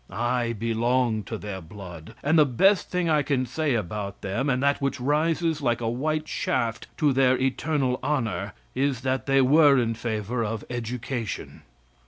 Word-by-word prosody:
I 120 0 -1
belong 115 +1 0
to 110 - -5
their 100 -3 -6
blood, 90 +1 -10
and 155 +3 +4
the - - +8
best 190 - +3
thing 180 -1 0
I 155 -2 +3
can 135 -2 0
say 145 +2 -1
about 100 -1 -4
them, 120 +9 -1
and 130 0 +1
that 140 0 +2
which 140 0 -1
rises 155 +3 +1
like 120 -3 +1
a 115 - -2
white 155 +6 -1
shaft 115 -6 -1
to 145 -3 +3
their 130 -1 +4
eternal 135 -1 0
honor, 110 -10 -1 0.2
is 135 -2 0
that 130 +1 -1
they 135 0 +4
were 145 +1 +6
in 115 -2 +1
favor 115 +1 -2
of 110 0 -3
education. 120 -1 -4
125 Hz, 170 wpm, -25 LUFS, 115-140 Hz, 0.2 s, the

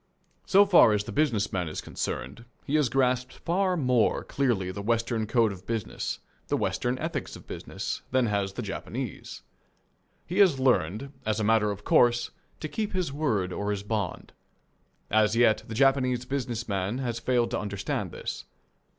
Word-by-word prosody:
So 200 +1 +6
far 175 - +7
as 105 -1 +1
the 115 - -7
business 115 -6 +1
man 90 -3 -1
is 75 - -5
concerned 70 - -5 0.2
he 140 - -4
has 150 -5 +3
grasped 125 -1 +1
far 185 +1 0
more 125 -6 +2
clearly 115 -10 0
the 100 - -6
Western 115 0 0
code 115 -2 +3
of 95 -1 -10
business, 115 -2 -3 0.3
the - - +1
Western 125 +1 -1
ethics 155 -2 -4
of - - -13
business, - - -5
than 130 -1 +2
has 100 -3 -1
the - - -4
Japanese. - - -6 0.8
He 180 +4 -2
has 185 -9 +5
learned, 125 - +1
as 110 0 0
a - - 0
matter 110 0 +3
of 100 0 -5
course, 120 +1 +3 0.3
to 155 - -2
keep 210 +6 -3
his 180 -7 -1
word 110 -12 0
or 100 0 -2
his 100 -1 -2
bond. 105 -4 -3 0.8
As 110 +1 +3
yet, 115 -2 +4
the 110 - -6
Japanese 130 -1 +2
business 125 -3 -3
man 100 +2 -1
has 120 -3 -2
failed 120 0 +1
to - - 0
understand 100 -1 -3
this. - - -6
120 Hz, 170 wpm, -27 LUFS, 105-135 Hz, 0.8 s, far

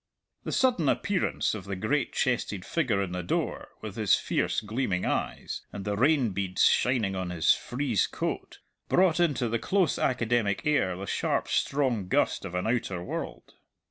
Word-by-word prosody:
The - - -3
sudden 240 - +2
appearance 200 -3 0
of 105 -4 -6
the 100 -1 -4
great 115 +8 0
chested 105 -6 -1
figure 120 -12 0
in 95 - -5
the 90 0 -3
door, 85 - -2
with - - -7
his - - +4
fierce, - - 0
gleaming 110 -4 -2
eyes, - - -2
and 100 - -7
the 105 0 -1
rain 130 0 +3
beads 95 -1 +1
shining 115 -6 +2
on 95 -1 -3
his 85 -3 +4
frieze 125 -4 -1
coat, - - -4 0.3
brought 180 -2 +4
into 145 -8 +2
the 115 +1 -1
close 185 - +1
academic 120 -3 +1
air 145 -12 +2
the 100 - -5
sharp, - - -1
strong 125 -9 0
gust - - +1
of 90 - -6
an 90 - -1
outer 110 -6 -1
world. - - -6
115 Hz, 170 wpm, -28 LUFS, 95-140 Hz, 0.3 s, his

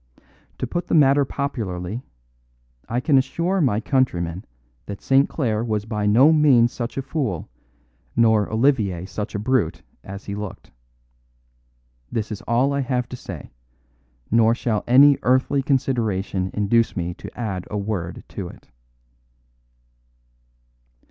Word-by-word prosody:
To - - -2
put 175 0 -3
the - - +1
matter 140 -2 +5
popularly, 110 -8 -4 0.9
I 120 - 0
can 135 +1 +4
assure 170 +8 0
my 120 -8 +2
countrymen 95 - -1 0.4
that 100 -1 -6
St. 135 +1 +3
Clare 115 -7 -1
was 105 -3 -2
by 105 -2 -2
no 130 +10 +6
means 135 -6 +5
such 120 0 -5
a 135 - -1
fool 125 - -3 0.7
nor 110 -3 +3
Olivier 110 -7 +1
such 105 +2 -5
a - - +1
brute 110 -6 0 0.2
as 100 +1 -9
he 100 - -5
looked. 105 -2 -7 1.4
This 110 -1 -3
is 105 - -5
all 125 +4 +2
I 140 - 0
have 125 -2 -1
to - - -6
say; 90 - -9 0.8
nor 115 +1 +4
shall 115 -3 -1
any 135 +3 +6
earthly 130 +2 +2
consideration 110 -9 0
induce 110 +2 +1
me 90 0 -2
to - - -11
add 95 -6 -3
a 105 - -3
word 100 -4 -4
to - - -5
it. - - -14
115 Hz, 135 wpm, -22 LUFS, 100-135 Hz, 1.4 s, no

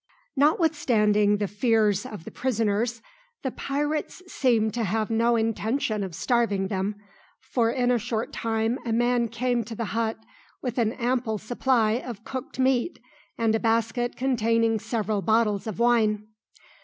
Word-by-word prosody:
Notwithstanding 245 - +3
the 205 0 -1
fears 210 0 +1
of 210 -9 -8
the - - -9
prisoners, 230 -1 -1 0.4
the 265 - -1
pirates 295 +7 -3
seemed 235 -10 +1
to 235 0 -1
have 215 +2 -1
no 230 +1 +3
intention 220 0 0
of 185 -4 -6
starving 215 -6 +1
them, 200 +1 -1 0.4
for 235 -3 0
in 245 0 +1
a 245 - +2
short 225 0 -3
time 225 +2 -1
a 235 - -3
man 240 +1 +2
came 240 +1 -1
to 225 +1 -7
the 230 - -3
hut 225 -1 0 0.4
with 250 -2 -3
an 225 -1 +1
ample 240 -3 -1
supply 235 +1 +1
of 230 -3 -8
cooked 265 +6 -6
meat 260 +3 +1 0.4
and 225 -1 +2
a 220 - +2
basket 230 +2 0
containing 230 -3 +1
several 215 -2 -1
bottles 220 -1 +1
of 215 - -4
wine. 220 -3 +2
230 Hz, 150 wpm, -26 LUFS, 215-245 Hz, 0.4 s, Notwithstanding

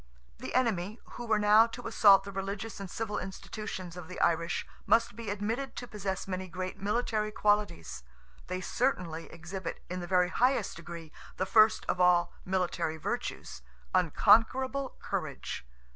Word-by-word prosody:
The - - -6
enemy, 220 -4 +1
who 240 - -7
were 220 -1 +3
now 210 +2 +6
to 240 +1 -9
assault 200 -3 +6
the 200 - -7
religious 195 +2 -4
and 195 -2 -6
civil 220 +2 -3
institutions 190 -2 -6
of 175 -3 -8
the 185 - -7
Irish, 170 0 +1 0.2
must 230 -2 +3
be 230 -2 -6
admitted 225 +6 -2
to 245 - -6
possess 195 -4 -4
many 185 0 -3
great 185 +1 -5
military 215 +1 0
qualities. 205 - 0 0.5
They 185 0 -3
certainly 180 -9 -1
exhibit, 175 +2 -6
in 180 - -2
the 175 - -5
very 180 0 +3
highest 255 +7 +1
degree, 170 -1 -9 0.3
the 190 - 0
first 215 +2 +5
of 180 - 0
all 175 -1 +4
military 180 -4 -1
virtues—unconquerable 185 - +1
courage. - - -4
195 Hz, 145 wpm, -30 LUFS, 175-220 Hz, 0.5 s, now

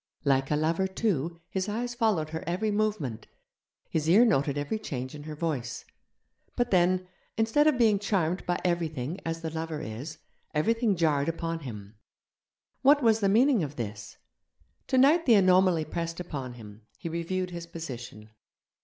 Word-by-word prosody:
Like 135 -2 +2
a 150 - +2
lover, 165 +5 +1
too, 170 - -1
his 190 +2 -2
eyes 240 +3 -2
followed 215 -10 0
her 160 - -4
every 185 +5 0
movement, 205 - -1 0.6
his 160 0 -1
ear 215 +8 +7
noted 145 - +1
every 145 +10 -2
change 130 -10 -5
in 150 0 -9
her 155 -1 -6
voice. 145 -7 -3 0.7
But 245 -1 0
then, 185 0 +3 0.3
instead 225 +7 +3
of 300 -4 +3
being 220 -4 +4
charmed 190 -4 0
by 175 - 0
everything 165 -2 -1
as 165 0 -3
the 160 -1 -4
lover 160 -1 -4
is, 140 +6 -6 0.4
everything 225 +6 +2
jarred 155 -4 +2
upon 165 0 -3
him. 105 -7 -9 0.8
What 285 +1 +5
was 225 -1 +4
the 200 -2 +2
meaning 240 +2 +4
of 145 -2 -4
this? 105 -4 -6 0.7
Tonight 280 +6 +4
the 235 - +7
anomaly 185 -4 +4
pressed 165 +1 -4
upon 140 -8 -5
him: 110 -2 -13
he - - -6
reviewed 180 +2 -2
his 170 -1 -7
position. 120 -10 -8
170 Hz, 160 wpm, -28 LUFS, 145-205 Hz, 0.8 s, ear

